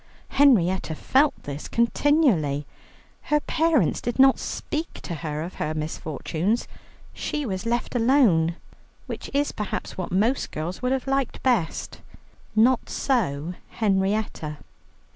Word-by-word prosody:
Henrietta 190 - +3
felt 275 - +2
this 145 +1 -6
continually. 235 - +2 0.6
Her 300 - +4
parents 310 - +1
did 240 - -3
not 270 0 +6
speak 315 +3 -4
to 175 - -5
her 155 -1 -4
of 175 - -7
her 155 +1 -1
misfortunes; 160 - -2 0.5
she 295 -1 -3
was 195 0 -3
left 235 +1 -1
alone, 225 - +3 0.5
which - - -6
is 285 +1 +1
perhaps 210 -2 -5
what 185 - -4
most 220 +9 +1
girls 165 +4 -5
would 250 0 0
have 265 -1 0
liked 270 -1 -1
best. 235 -11 0 0.5
Not 240 +3 +3
so 175 - 0 0.2
Henrietta. 195 -6 0
215 Hz, 125 wpm, -25 LUFS, 160-265 Hz, 0.6 s, not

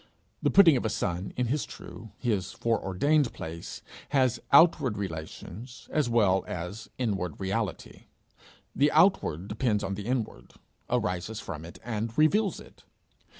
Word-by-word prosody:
The - - +2
putting 175 -7 +7
of - - -2
a 110 - 0
son 90 -1 -2
in 125 - +1
his 135 +5 0
true, 115 - -10
his 105 -8 -1
foreordained 115 +6 +1
place, 85 +1 -7 0.3
has 130 -4 +2
outward 140 -7 +5
relations 95 - -7
as 150 -5 +2
well 100 -5 +3
as 90 +6 -6
inward 95 - -2
reality; 100 0 -3 0.7
the 145 +2 +3
outward 155 - +3
depends 105 0 0
on 95 - -2
the 100 +2 -5
inward, 125 -3 -3 0.4
arises 90 +4 -1
from 80 -8 -6
it, 85 - -11
and 115 -1 -3
reveals 195 +6 +3
it. - - -16
110 Hz, 140 wpm, -28 LUFS, 95-130 Hz, 0.7 s, putting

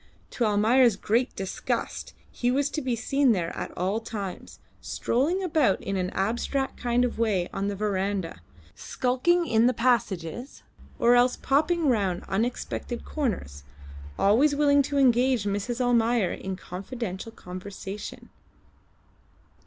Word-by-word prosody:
To 240 - 0
Almayer's 220 +3 +4
great 230 +5 0
disgust 195 -1 -3 0.2
he 245 - -1
was 280 +3 +1
to 310 - -2
be 255 -3 -1
seen 270 +2 +2
there 170 -4 -2
at - - -4
all 190 +5 0
times, 210 -5 -7 0.2
strolling 320 +11 0
about 305 - +2
in 195 - -4
an 185 -1 -1
abstracted 240 +7 -1
kind 245 0 +2
of 240 - -4
way 200 -6 +1
on 195 +1 -2
the 205 - -2
verandah, 195 - -2 0.3
skulking 300 +8 +1
in 230 -4 +3
the 250 - +1
passages, 230 - -1 0.3
or 235 +1 +4
else 245 +1 +4
popping 310 +4 +1
round 200 -8 +1
unexpected 235 +3 -3
corners, 185 - -3 0.5
always 265 +9 +4
willing 285 -1 +4
to 285 +1 -2
engage 255 -3 +3
Mrs. 205 +4 -2
Almayer 235 -5 +2
in 190 0 -5
confidential 190 +3 -6
conversation. 195 +1 -8
235 Hz, 130 wpm, -26 LUFS, 195-255 Hz, 0.5 s, Almayer's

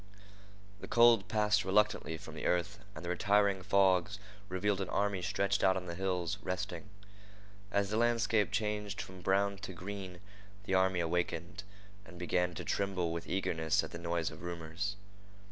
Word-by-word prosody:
The - - -8
cold 115 -4 +5
passed 105 -1 +2
reluctantly 95 -3 +1
from - - -10
the - - -3
earth, 90 +4 0 0.2
and - - -7
the - - -3
retiring 100 +1 +2
fogs 95 0 +3 0.3
revealed 95 +2 0
an 95 - -3
army 100 -2 0
stretched 100 +1 0
out 95 -1 +4
on 90 - -4
the 85 - -5
hills, 90 0 -2
resting. 95 0 -4 0.8
As 100 0 +1
the 110 - +1
landscape 115 -2 +2
changed 105 -1 -2
from 95 -1 -7
brown 100 +1 +1
to 95 - -7
green, 95 0 -7 0.4
the 95 - -3
army 95 -1 +3
awakened, 85 +2 -2 0.4
and 85 -1 -13
began 90 0 0
to - - -6
tremble 95 -4 -1
with 85 0 -5
eagerness 80 -4 +1
at - - -7
the 85 - -6
noise 85 -1 -1
of - - -11
rumors. 85 +3 -4
95 Hz, 160 wpm, -33 LUFS, 90-100 Hz, 0.8 s, cold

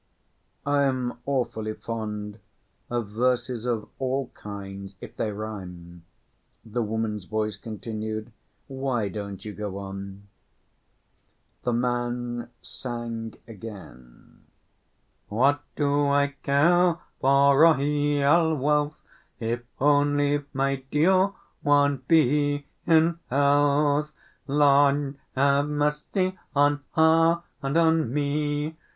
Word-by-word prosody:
"I 145 0 +2
am 130 -2 -1
awfully 115 -5 -1
fond 105 -2 -5 0.5
of 120 -4 -2
verses 120 +1 0
of 115 -3 -1
all 130 0 -1
kinds, 100 -1 -8
if - - -10
they 110 - -2
rhyme," 90 -5 -8 0.6
the 115 +2 -2
woman's 110 -2 -2
voice 110 +1 -2
continued. 110 0 -6 0.3
"Why 130 -6 -2
don't 100 0 -7
you 105 - -5
go 100 -1 -5
on?" 100 0 -7 1.4
The 120 - -1
man 120 0 -2
sang 115 -2 -6
again: 95 - -12 0.8
What 135 +7 +2
do 145 -1 +2
I 140 0 +2
care 170 +5 +3 0.2
for 140 +1 +4
royal 145 +1 +4
wealth 150 +1 +1 0.4
If 120 +1 -2 0.2
but 145 0 +3
my 135 0 0
dear 185 +7 +3 0.3
one 145 -1 +3
be 145 -2 +3 0.2
in 165 0 +4
health? 145 +2 +3 0.4
Lord 140 0 +3 0.2
have 140 +2 +3
mercy 150 +6 -1 0.2
On 145 0 +3
her 165 +1 +4 0.2
and 140 +3 0
on 160 -6 +3
me! 145 +2 -1
135 Hz, 100 wpm, -26 LUFS, 110-145 Hz, 1.4 s, for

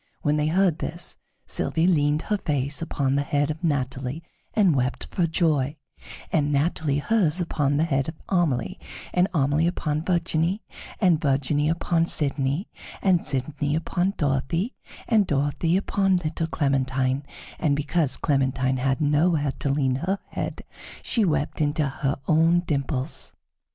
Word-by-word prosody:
When 150 -1 +2
they 150 0 +1
heard 175 0 +2
this, 170 +1 -4 0.3
Sylvie 160 - +2
leaned 150 -3 +2
her 210 - 0
face 145 -2 -1
upon 140 -5 -1
the 140 - +2
head 145 +1 0
of 155 +3 -8
Natalie 135 -1 -2 0.3
and 195 -8 +4
wept 125 0 -1
for 175 -3 +1
joy; 155 -4 +1 0.6
and 145 -2 +1
Natalie 145 0 +1
hers 180 0 +2
upon 145 -5 0
the 155 - +3
head 140 -3 0
of 160 - -7
Amelie, 165 -11 0 0.3
and 180 +1 +3
Amelie 150 0 +2
upon 155 -3 -1
Virginie, 170 +2 0 0.4
and 175 -6 +3
Virginie 145 +1 +1
upon 165 0 +1
Sidonie, 140 +3 -1 0.4
and 180 -4 +2
Sidonie 145 +1 -1
upon 175 +4 0
Dorothée, 165 - -1 0.3
and 215 -5 +3
Dorothée 145 +5 +1
upon 195 -1 +1
little 165 -1 -2
Clementine, 135 -2 0 0.4
and 145 -4 +2
because 150 -1 0
Clementine 130 -2 +1
had 135 +3 0
nowhere 150 0 +2
to 140 - 0
lean 135 -2 +1
her 185 +7 -1
head, - - -4 0.4
she 230 - +2
wept 155 -4 0
into 150 0 +1
her 135 0 -1
own 165 +2 +4
dimples. 140 - -3
150 Hz, 145 wpm, -25 LUFS, 140-170 Hz, 0.6 s, and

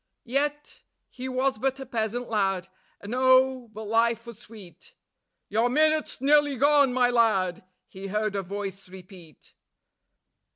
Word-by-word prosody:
Yet... 290 +4 -2 0.3
he 260 +1 -6
was 260 -2 -1
but 270 +2 -1
a 270 - -7
peasant 235 0 -3
lad, 195 -4 -1 0.3
and 205 +3 -7
oh! 260 -1 +3
but 215 +1 -8
life 230 +2 +1
was 235 -3 -11
sweet.... 200 -8 -14 0.5
"Your 225 +4 +1
minute's 310 +3 +1
nearly 290 0 +3
gone, 285 0 +4
my 245 -1 +2
lad," 195 -7 +1 0.2
he 195 +1 -9
heard 210 +1 -2
a 200 - -1
voice 195 0 -7
repeat. 180 -4 -14
230 Hz, 135 wpm, -26 LUFS, 200-260 Hz, 0.5 s, gone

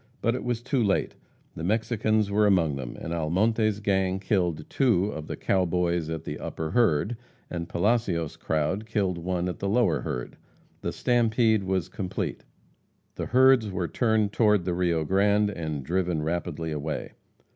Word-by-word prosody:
But 115 - +1
it 125 - -4
was 120 -1 -2
too 130 -1 +1
late. 100 -2 +1 0.4
The 80 - -6
Mexicans 110 +1 +1
were 105 +1 +4
among 85 -7 +3
them, 65 -3 -6
and 85 - -5
Almonte's 105 +6 +1
gang 95 -2 +1
killed 90 -6 0
two 105 -7 +2
of 80 -4 -7
the - - -4
"cow 95 -1 +1
boys" 85 -2 0
at 80 -2 -4
the - - -5
upper 80 -1 -4
herd, 110 -1 +2 0.4
and 85 -1 -4
Palacios' 90 -5 0
crowd 80 +8 -1
killed 95 -5 0
one 90 +1 -2
at 90 - -4
the 100 - -1
lower 120 +3 +2
herd. 60 -1 -5 0.4
The - - -2
"stampede" 115 -3 +2
was 95 -2 0
complete. 95 0 -4 0.7
The - - -4
herds 130 -3 +5
were 90 -3 -2
turned 110 -2 +1
toward 105 -5 +3
the 90 - 0
Rio 85 -2 +1
Grande, 100 +3 +3
and 80 -6 -4
driven 85 0 -1
rapidly 80 -1 -3
away. 75 0 -4
95 Hz, 165 wpm, -26 LUFS, 85-110 Hz, 0.7 s, herds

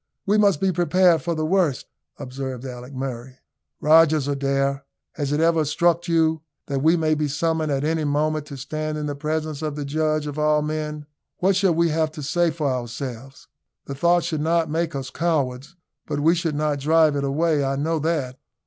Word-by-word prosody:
"We 210 +2 +3
must 200 -7 +3
be 190 -1 +2
prepared 175 -1 +3
for 170 0 -2
the 155 0 -1
worst," 170 -6 +1 0.3
observed 130 0 -6
Alick 125 0 -8
Murray. 130 -1 -5 0.4
"Rogers, 155 -2 +4
Adair, 140 0 0 0.3
has 145 -3 -3
it 145 - +1
ever 165 -1 +3
struck 170 +3 +1
you 160 -2 +2 0.2
that 140 -2 -2
we 160 +4 +4
maybe 155 -2 +1
summoned 160 +1 -1
at 135 0 0
any 160 +1 0
moment 150 +1 0
to 140 - -8
stand 155 +3 -4
in 150 - -3
the 145 - -2
presence 155 +1 -3
of 155 -2 -3
the 145 -1 -4
Judge 155 +1 0
of 145 0 -5
all 150 0 +2
men? 150 -1 -4 0.3
What 190 +1 +2
shall 190 -3 +2
we 170 0 +2
have 160 0 +1
to 150 -2 -7
say 170 +4 +1
for 155 -1 -4
ourselves? 130 +1 -5 0.4
The 140 - -5
thought 170 +5 +2
should 155 -2 -2
not 165 0 +1
make 165 -1 -1
us 135 -2 -5
cowards, 145 -3 -2 0.3
but 145 -2 -2
we 160 +3 +4
should 165 -3 -1
not 150 -1 0
drive 155 +1 +3
it 140 - -1
away 150 +2 +1
I 135 0 0
know 160 +3 -1
that." 145 -5 -2
155 Hz, 195 wpm, -23 LUFS, 140-165 Hz, 0.4 s, Rogers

